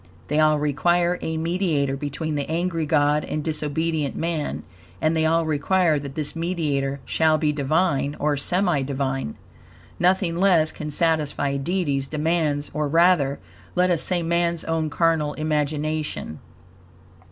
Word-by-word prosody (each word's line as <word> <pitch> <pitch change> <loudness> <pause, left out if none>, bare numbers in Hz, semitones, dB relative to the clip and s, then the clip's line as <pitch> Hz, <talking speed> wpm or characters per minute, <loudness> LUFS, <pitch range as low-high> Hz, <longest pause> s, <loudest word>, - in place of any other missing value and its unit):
They 150 +1 +1
all 155 -1 +4
require 175 +4 +1
a 160 0 -3
mediator 160 -5 0
between 145 +2 -4
the 145 -1 -3
angry 165 -1 -1
God 150 0 +2
and 150 - -3
disobedient 155 -1 -1
man, 165 -3 -2 0.4
and 155 +7 +1
they 160 0 +2
all 165 +1 +2
require 155 +1 +2
that 140 -1 -8
this 150 0 -2
mediator 150 -5 -1
shall 160 -1 +2
be 155 -1 +1
Divine, 145 0 0
or 150 0 +1
semi 175 +1 +1
Divine. 135 - -2 0.6
Nothing 180 -1 +2
less 175 -4 +3
can 150 - -6
satisfy 150 -3 0
Deity's 140 -2 -1
demands; 155 -1 -1
or, 150 -1 -1
rather, 165 -3 +3 0.4
let 180 0 +3
us 170 - +1
say 175 -2 -1
man's 170 0 0
own 160 -1 -1
carnal 155 -1 +1
imagination. 155 - -2
155 Hz, 140 wpm, -23 LUFS, 145-170 Hz, 0.6 s, all